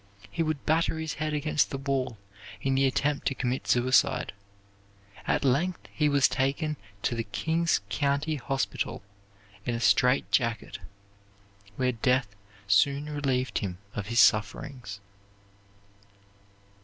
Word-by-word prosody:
He 170 - -2
would 155 -3 -1
batter 160 +1 +2
his 160 -2 -3
head 155 0 -2
against 150 0 +1
the 135 - -3
wall 135 -4 -2 0.4
in 135 - 0
the 135 0 +3
attempt 140 +2 0
to 135 - 0
commit 125 0 -2
suicide. 130 +1 +3 0.9
At - - +1
length 160 +8 +1
he 150 -1 +2
was 140 -1 +4
taken 145 +3 -1 0.3
to - - +1
the 115 -1 -2
King's 160 +11 0
County 145 +4 0
Hospital 135 -5 -2 0.6
in 120 - -1
a - - -3
strait 125 +5 +3
jacket, 115 -3 0 1.0
where 130 -1 +1
death 125 -2 0 0.3
soon 140 +9 +3
relieved 135 -3 0
him 95 -4 -4 0.2
of 105 -2 -4
his 115 +1 +1
sufferings. 105 0 +2
135 Hz, 130 wpm, -28 LUFS, 120-150 Hz, 1.0 s, was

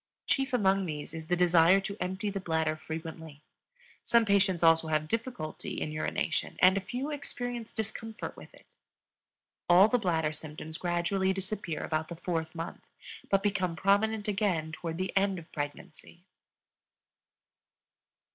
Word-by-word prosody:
Chief 270 -2 +1
among 195 -5 +2
these 150 0 -5
is 160 -1 -7
the 180 - +2
desire 175 +1 +5
to 200 +1 -4
empty 190 +3 -2
the 195 - -3
bladder 160 -3 0
frequently; 160 -1 -7 0.6
some 235 -1 +4
patients 195 -4 +3
also 165 0 +5
have 155 -1 0
difficulty 230 -5 -4
in 155 - -3
urination, 155 0 -2
and 185 +1 +6
a 195 - 0
few 250 +9 -4
experience 245 -5 -4
discomfort 220 +1 -5
with - - -12
it. - - -19 1.0
All 180 +4 +8
the 245 +2 +2
bladder 160 -6 0
symptoms 155 +1 -7
gradually 180 +2 +1
disappear 190 -3 -4
about 155 0 -1
the 170 - -7
fourth 165 -1 -3
month, 165 +1 -5 0.5
but 195 0 +3
become 185 -4 0
prominent 205 +4 +2
again 190 -7 0
toward 165 0 -5
the 185 +1 -3
end 195 -1 +2
of 165 -2 -11
pregnancy. 155 +4 -7
180 Hz, 145 wpm, -30 LUFS, 160-200 Hz, 1.0 s, All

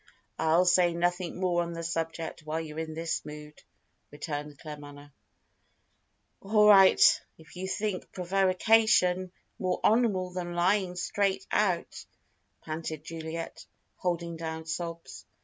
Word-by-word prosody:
"I'll 160 +3 +3
say 180 -1 +4
nothing 175 +1 -1
more 180 -2 +1
on 170 0 -4
the 165 0 -5
subject 165 0 -3
while 155 +1 -3
you're 155 -1 -6
in 160 -1 -5
this 165 0 -2
mood," 150 0 -10 0.5
returned 145 0 -6
Claremanagh. 145 -1 -10 1.3
"All 210 +1 +4
right, 195 -2 +7 0.2
if 160 +2 -17
you 185 +1 -4
think 200 -1 -3
prevarication 185 0 +3 0.3
more 185 -1 -1
honourable 210 -6 +2
than 175 -1 -5
lying 185 +1 +1
straight 195 +2 -1
out," 185 -5 0 0.6
panted 155 -1 -5
Juliet, 165 0 -7 0.3
holding 170 -2 -2
down 160 0 -5
sobs. 165 0 -6
170 Hz, 120 wpm, -29 LUFS, 160-185 Hz, 1.3 s, right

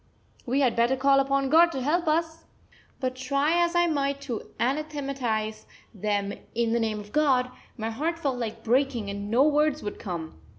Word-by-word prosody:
We 265 +4 +1
had 250 -4 +2
better 235 +3 +3
call 275 +1 +4
upon 275 0 +1
God 335 +2 +6
to 270 - -2
help 335 +5 +1
us!" 320 +1 0 0.5
But 255 -1 -2
try 280 +6 +1
as 345 0 -1
I 345 0 +4
might 280 -4 0
to 250 -6 -5
anathematise 260 -5 -2 0.3
them 205 -1 -1 0.2
in 230 -1 +1
the 235 - +2
name 220 -2 -1
of 210 0 -11
God, 265 -4 +2 0.3
my 225 0 -3
heart 315 +8 -2
felt 275 -6 -2
like 225 -2 -5
breaking 240 -3 +1
and 200 +1 -5
no 240 +5 +4
words 300 0 +2
would 205 - -5
come. 165 - -6
270 Hz, 180 wpm, -26 LUFS, 225-300 Hz, 0.5 s, God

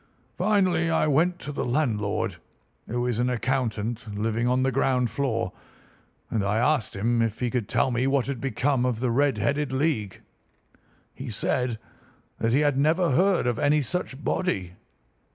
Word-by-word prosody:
Finally, 185 -6 +2
I 160 - +2
went 160 +5 +2
to 145 - -5
the 140 - -3
landlord, 115 - -1 0.5
who 120 +1 -1
is 120 -2 -1
an 125 +1 +2
accountant 115 -3 -2
living 115 +2 0
on 125 +1 +2
the 135 - +2
ground 125 -2 +1
floor, 115 -9 -1 0.8
and 110 -3 0
I 100 +2 0
asked 125 -2 +1
him 115 +4 +1
if 115 -1 -1
he 125 -2 -1
could 120 -5 -2
tell 130 - +2
me 125 +2 +1
what 135 -2 +2
had 135 -4 -4
become 135 -1 0
of 125 -3 0
the 125 -1 0
Red 140 0 +2
headed 140 +7 0
League. 130 -8 -1 0.9
He - - -7
said 120 +2 -1 0.6
that 115 - +1
he 135 +5 +3
had 145 -2 +2
never 160 +3 +3
heard 185 +5 +3
of 120 -2 0
any 150 0 +3
such 140 0 -4
body. 95 - -1
125 Hz, 170 wpm, -26 LUFS, 115-145 Hz, 0.9 s, he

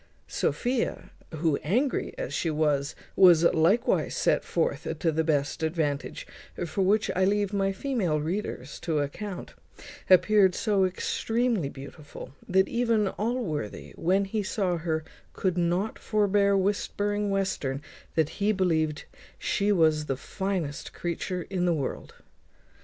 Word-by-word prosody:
Sophia, 245 -1 -1 0.2
who, 160 -2 0
angry 245 - 0
as - - -4
she 165 - 0
was, 150 -2 0 0.2
was 175 -4 +7
likewise 190 +10 +2
set - - +2
forth - - -1
to 165 - +1
the 160 +1 0
best 150 -1 0
advantage, 155 -3 -2 0.4
for 170 +4 -2
which 205 +3 +2
I 185 - +2
leave 205 +1 +1
my 195 -1 +1
female 195 - -1
readers 155 -4 -4
to 160 -3 -1
account, 180 +7 -4 0.6
appeared 190 0 +5
so 205 -4 +2
extremely 225 - 0
beautiful, 140 -1 -10 0.2
that 190 +1 +4
even 230 -4 +1
Allworthy, 205 - -3
when 190 +4 +1
he 210 +2 -2
saw 190 -3 -1
her, 160 -1 -2 0.3
could 185 -3 -1
not 175 +4 0
forbear 200 -1 +2
whispering 205 +1 0
Western, 190 -9 -1 0.4
that 160 -2 +2
he 205 +1 +3
believed 160 -6 0 0.3
she 200 +1 0
was 155 -5 +3
the 135 - -1
finest 180 -4 -4
creature 175 +1 -3
in 180 -2 0
the 175 -2 +2
world. 140 -4 -4
185 Hz, 130 wpm, -27 LUFS, 160-205 Hz, 0.6 s, was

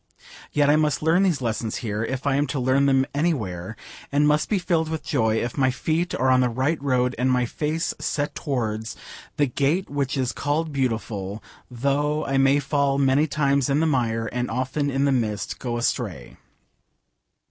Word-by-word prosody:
Yet 145 -1 +3
I 150 +1 +5
must 155 -1 +1
learn 165 +4 +4
these 175 -9 +1
lessons 115 -1 -2
here, 105 0 -2
if 130 +3 -4
I 140 - +2
am 145 +2 +1
to 135 +1 -2
learn 130 +2 +3
them 135 -1 +3
anywhere, 110 - -2 0.4
and 145 +1 +3
must 150 +1 +2
be 210 - +2
filled 170 -3 0
with 160 -1 -4
joy 110 -6 +1
if 120 +5 -2
my 130 -1 +4
feet 160 +7 -1
are 130 - +1
on 130 0 +5
the 125 - +2
right 130 +7 -1
road 125 -2 +1
and 130 +1 +2
my 125 -1 +2
face 155 +6 -2
set 145 0 -2
towards 110 -6 -3 0.4
'the 145 - +4
gate 145 +8 0
which 140 -1 -1
is 130 -2 0
called 150 +2 -2
beautiful,' 110 -6 -2 0.3
though 140 +5 0
I 135 0 +1
may 135 +1 +4
fall 140 -1 +1
many 140 +2 +3
times 140 -2 +1
in 140 +2 +2
the 160 - +2
mire 115 -6 0
and 125 +2 -3
often 130 +4 -1
in 135 +1 +1
the 140 - +3
mist 110 -6 -1
go 120 -2 -3
astray. 105 - -2
135 Hz, 190 wpm, -24 LUFS, 120-150 Hz, 0.4 s, I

